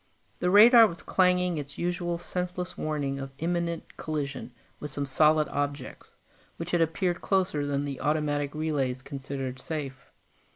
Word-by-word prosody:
The 180 Hz, -, +1 dB
radar 225 Hz, +4 st, +8 dB
was 170 Hz, -4 st, -9 dB
clanging 180 Hz, -3 st, +2 dB
its 145 Hz, -1 st, -8 dB
usual 175 Hz, 0 st, -1 dB
senseless 180 Hz, +1 st, -4 dB
warning 145 Hz, -3 st, -2 dB
of 135 Hz, 0 st, -5 dB
imminent 170 Hz, +1 st, -3 dB
collision 145 Hz, -4 st, -4 dB, 0.3 s
with 150 Hz, -, -6 dB
some 140 Hz, +1 st, -3 dB
solid 155 Hz, +3 st, +3 dB
objects, 145 Hz, 0 st, -4 dB, 0.4 s
which 165 Hz, +1 st, -5 dB
had 175 Hz, -, +2 dB
approached 170 Hz, +2 st, 0 dB
closer 180 Hz, -7 st, 0 dB
than 140 Hz, 0 st, -1 dB
the 140 Hz, -2 st, -5 dB
automatic 145 Hz, -1 st, 0 dB
relays 140 Hz, -5 st, -1 dB
considered 135 Hz, -2 st, -5 dB
safe. 135 Hz, -5 st, -6 dB
155 Hz, 140 wpm, -28 LUFS, 140-175 Hz, 0.4 s, radar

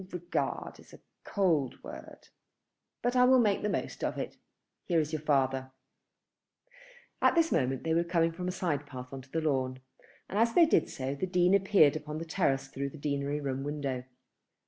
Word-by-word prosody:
"Regard 175 Hz, -1 st, -3 dB
is -, -, -17 dB
a -, -, -17 dB, 0.2 s
cold 165 Hz, -, 0 dB
word, -, -, -11 dB, 0.7 s
but 245 Hz, +1 st, +1 dB
I 250 Hz, -, +6 dB
will 260 Hz, +1 st, +6 dB
make 210 Hz, -5 st, +3 dB
the 210 Hz, -, -1 dB
most -, -, -3 dB
of -, -, -1 dB
it. -, -, -4 dB, 0.5 s
Here 170 Hz, -3 st, +2 dB
is 155 Hz, 0 st, -2 dB
your 155 Hz, -, -2 dB
father." 135 Hz, -3 st, +1 dB, 1.5 s
At -, -, +4 dB
this 330 Hz, -1 st, +3 dB
moment 130 Hz, 0 st, 0 dB
they 160 Hz, -, 0 dB
were 170 Hz, +1 st, +3 dB
coming 170 Hz, -1 st, +1 dB
from 180 Hz, +2 st, -5 dB
a -, -, 0 dB
side 150 Hz, -6 st, -2 dB
path 125 Hz, -1 st, -9 dB
on 135 Hz, -, -6 dB
to 130 Hz, -, -19 dB
the 165 Hz, -, -1 dB
lawn, 130 Hz, -4 st, 0 dB, 0.5 s
and 200 Hz, -, -2 dB
as 230 Hz, 0 st, +2 dB
they 340 Hz, -, +8 dB
did 315 Hz, -, +2 dB
so 135 Hz, +1 st, -3 dB
the 140 Hz, +7 st, -3 dB
Dean 180 Hz, 0 st, +3 dB
appeared 190 Hz, -7 st, +5 dB
upon 150 Hz, 0 st, -5 dB
the 165 Hz, -, -5 dB
terrace 135 Hz, -6 st, 0 dB
through 140 Hz, +1 st, -4 dB
the 145 Hz, -, -12 dB
deanery 140 Hz, 0 st, -2 dB
room 135 Hz, -2 st, -3 dB
window. 140 Hz, -3 st, -3 dB
155 Hz, 190 wpm, -30 LUFS, 135-180 Hz, 1.5 s, they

